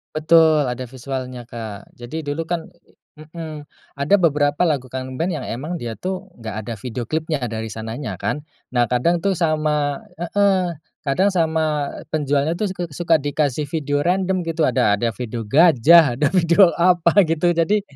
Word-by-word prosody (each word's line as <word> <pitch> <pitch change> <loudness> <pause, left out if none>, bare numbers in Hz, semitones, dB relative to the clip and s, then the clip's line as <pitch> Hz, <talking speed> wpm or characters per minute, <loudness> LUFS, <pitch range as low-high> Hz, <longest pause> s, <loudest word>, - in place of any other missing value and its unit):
Betul 155 -1 +5
ada 125 +1 -5
visualnya, 130 -1 -6
Kak. 110 -4 -8
Jadi 135 +7 -6
dulu 145 +3 -3
kan 170 -2 -3 0.5
mhm, 155 -1 -8 0.3
ada 140 +8 +3
beberapa 150 -4 +2
lagu 145 -7 0
Kangen 130 0 -6
Band 170 0 0
yang - - -6
emang 150 +9 -4
dia 120 -8 -6
tuh 190 +1 -5
nggak 110 -2 -6
ada 115 +2 -5
video 120 +2 -5
klipnya 155 +1 -2
dari 110 0 -4
sananya 110 +2 -5
kan, 150 - -2 0.3
nah 120 -1 +2
kadang 165 +8 +1
tuh 195 - +3
sama 155 -3 0 0.2
heeh, 185 -1 +1 0.3
kadang 155 +8 +2
sama 160 -4 0 0.2
penjualnya 145 0 +1
tuh 210 +4 -1
suk 175 -3 -5
suka 165 +2 +2
dikasih 145 0 -1
video 145 -1 -1
random 185 0 +1
gitu, 165 0 -2
ada 105 -4 +2
ada 115 +3 -1
video 120 -1 -4
gajah 155 +3 +6
ada 145 +4 +2
video 175 +1 +5
apa 175 +2 +4
gitu. 165 +2 +1
Jadi, 205 +5 +2
155 Hz, 160 wpm, -21 LUFS, 130-170 Hz, 0.5 s, gajah